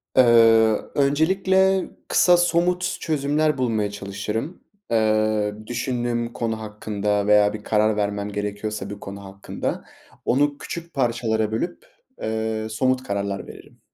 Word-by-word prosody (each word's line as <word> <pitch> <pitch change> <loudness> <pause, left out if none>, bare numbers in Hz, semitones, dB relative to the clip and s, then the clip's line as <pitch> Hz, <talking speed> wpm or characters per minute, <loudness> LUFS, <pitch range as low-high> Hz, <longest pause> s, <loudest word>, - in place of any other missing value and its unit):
Eee, 130 - +7 0.7
öncelikle 190 +7 +2 0.2
kısa 180 -1 +5
somut 175 +1 +1
çözümler 150 0 0
bulmaya 110 -5 0
çalışırım. 105 - -5 0.3
Eee, 110 -1 +2
düşündüğüm 120 -1 -2
konu 110 -2 -2
hakkında 105 -1 -2
veya 105 0 +5
bir 105 -1 -7
karar 110 0 +2
vermem 100 0 -1
gerekiyorsa 105 0 -4
bir 105 0 -7
konu 100 0 -8
hakkında. 95 0 -5 0.4
Onu 145 +3 +2
küçük 170 +3 -7
parçalara 115 -4 0
bölüp, 170 +11 -3 0.4
eee, 110 0 -2
somut 130 +3 0
kararlar 100 -2 -3
veririm. - - -14
110 Hz, 115 wpm, -23 LUFS, 105-140 Hz, 0.7 s, Eee